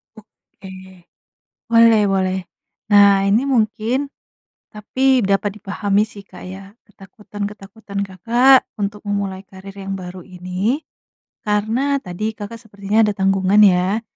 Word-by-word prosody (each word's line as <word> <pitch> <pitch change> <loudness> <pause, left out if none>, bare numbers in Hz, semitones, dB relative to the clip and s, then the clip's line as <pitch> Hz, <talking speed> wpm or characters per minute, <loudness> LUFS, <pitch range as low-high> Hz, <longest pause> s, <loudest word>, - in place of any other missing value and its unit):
Oke, 200 -2 -17 1.0
boleh 230 -2 +5
boleh. 190 0 0 0.5
Nah, 200 -1 +6
ini 220 +6 +3
mungkin 235 +3 0 0.7
tapi 260 +5 +1
dapat 200 +1 -1
dipahami 200 +1 -1
sih 200 -2 -12
Kak 185 - -13
ya 195 +1 -10 0.2
ketakutan-ketakutan 205 0 -8
Kakak 240 +8 +4 0.2
untuk 205 +1 -4
memulai 200 -2 -3
karir 190 +1 -13
yang 195 0 -6
baru 180 -1 -9
ini, 185 - -3 0.7
karena 225 +7 0
tadi 215 +5 -4
Kakak 215 +2 -8
sepertinya 210 0 0
ada 210 - 0
tanggungan 195 +1 +2
ya, 190 +3 +3
205 Hz, 115 wpm, -19 LUFS, 195-220 Hz, 1.0 s, Nah